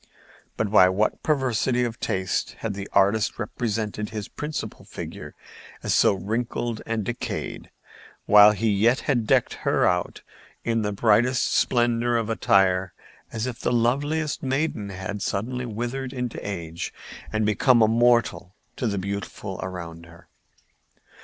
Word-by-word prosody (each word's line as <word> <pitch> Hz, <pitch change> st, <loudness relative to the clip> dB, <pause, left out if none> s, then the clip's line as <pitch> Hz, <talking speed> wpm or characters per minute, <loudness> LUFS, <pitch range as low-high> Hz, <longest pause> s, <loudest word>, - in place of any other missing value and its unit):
But 105 Hz, -3 st, -1 dB
by 95 Hz, -4 st, +7 dB
what 105 Hz, +3 st, 0 dB
perversity 130 Hz, -4 st, +1 dB
of 115 Hz, -2 st, -3 dB
taste 95 Hz, 0 st, -1 dB
had 115 Hz, -3 st, -2 dB
the 100 Hz, 0 st, -6 dB
artist 105 Hz, +3 st, +2 dB
represented 105 Hz, -2 st, -3 dB
his 105 Hz, -2 st, -5 dB
principal 150 Hz, -1 st, -6 dB
figure -, -, -8 dB, 0.5 s
as -, -, 0 dB
so -, -, +5 dB
wrinkled 115 Hz, +3 st, -3 dB
and 115 Hz, -1 st, -1 dB
decayed, 120 Hz, -1 st, -5 dB, 0.6 s
while 105 Hz, 0 st, +8 dB
yet 110 Hz, +4 st, +2 dB
he -, -, -13 dB
had 120 Hz, -6 st, +1 dB
decked -, -, +3 dB
her -, -, +2 dB
out 90 Hz, 0 st, 0 dB, 0.4 s
in 115 Hz, -1 st, 0 dB
the 105 Hz, -1 st, -1 dB
brightest 120 Hz, +5 st, +2 dB
splendor 120 Hz, -1 st, +2 dB
of 115 Hz, -1 st, -1 dB
attire, 95 Hz, -5 st, +2 dB, 0.4 s
as 110 Hz, +1 st, -3 dB
if 125 Hz, -2 st, -5 dB
the -, -, -1 dB
loveliest 145 Hz, +6 st, 0 dB
maiden 135 Hz, -6 st, -1 dB
had 100 Hz, +2 st, -5 dB
suddenly 125 Hz, +6 st, -2 dB
withered 120 Hz, +4 st, -4 dB
into 125 Hz, -3 st, -4 dB
age 85 Hz, -4 st, -5 dB, 0.4 s
and 110 Hz, -1 st, 0 dB
become 115 Hz, +3 st, +4 dB
a -, -, +5 dB
moral 115 Hz, -6 st, +2 dB, 0.2 s
to 125 Hz, -, -1 dB
the 100 Hz, -2 st, -1 dB
beautiful 100 Hz, 0 st, -5 dB
around 85 Hz, -3 st, -7 dB
her? 85 Hz, 0 st, -17 dB
110 Hz, 140 wpm, -24 LUFS, 100-120 Hz, 0.6 s, while